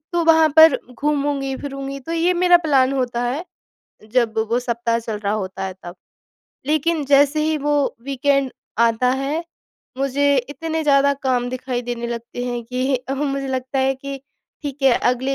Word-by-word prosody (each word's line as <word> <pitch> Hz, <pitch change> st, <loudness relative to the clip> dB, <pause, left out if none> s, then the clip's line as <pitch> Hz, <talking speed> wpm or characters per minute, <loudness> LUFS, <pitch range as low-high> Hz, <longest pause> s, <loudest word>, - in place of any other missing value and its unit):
तो 345 Hz, -1 st, +1 dB
वहाँ 320 Hz, -1 st, +5 dB
पर 315 Hz, -3 st, +8 dB
घूमूँगी-फिरूँगी। 275 Hz, -1 st, -2 dB
तो 300 Hz, +5 st, -6 dB
ये 340 Hz, +2 st, +2 dB
मेरा 355 Hz, 0 st, +5 dB
प्लान 270 Hz, -3 st, +3 dB
होता 245 Hz, -3 st, -1 dB
है, 270 Hz, +8 st, -2 dB, 0.7 s
जब 230 Hz, -3 st, +1 dB
वो 235 Hz, -, +2 dB
सप्ताह 235 Hz, -1 st, -1 dB
चल 225 Hz, -2 st, -5 dB
रहा 205 Hz, -1 st, -2 dB
होता 190 Hz, -2 st, -4 dB
है, 190 Hz, -1 st, -5 dB
तब। 175 Hz, +1 st, -8 dB, 0.7 s
लेकिन 310 Hz, +1 st, +1 dB
जैसे 285 Hz, +2 st, +4 dB
ही 315 Hz, 0 st, +1 dB
वो 290 Hz, 0 st, 0 dB
वीकेंड 275 Hz, 0 st, +1 dB, 0.4 s
आता 250 Hz, +3 st, +1 dB
है, 310 Hz, +5 st, -2 dB, 0.5 s
मुझे 280 Hz, +1 st, +2 dB
इतने 315 Hz, +5 st, -3 dB
ज़्यादा 280 Hz, -1 st, +4 dB
काम 250 Hz, -2 st, 0 dB
दिखाई 255 Hz, -1 st, -3 dB
देने 240 Hz, -1 st, -4 dB
लगते 235 Hz, +1 st, -5 dB
हैं 245 Hz, -1 st, -3 dB
कि 255 Hz, +3 st, -1 dB
अ, 255 Hz, +2 st, -5 dB
मुझे 275 Hz, -1 st, -2 dB
लगता 260 Hz, +1 st, -2 dB
है 265 Hz, 0 st, +2 dB
कि 275 Hz, 0 st, -7 dB, 0.4 s
ठीक 285 Hz, -1 st, -6 dB
है, 270 Hz, -, +6 dB, 0.2 s
अगले 260 Hz, +2 st, 0 dB
270 Hz, 165 wpm, -21 LUFS, 245-290 Hz, 0.7 s, पर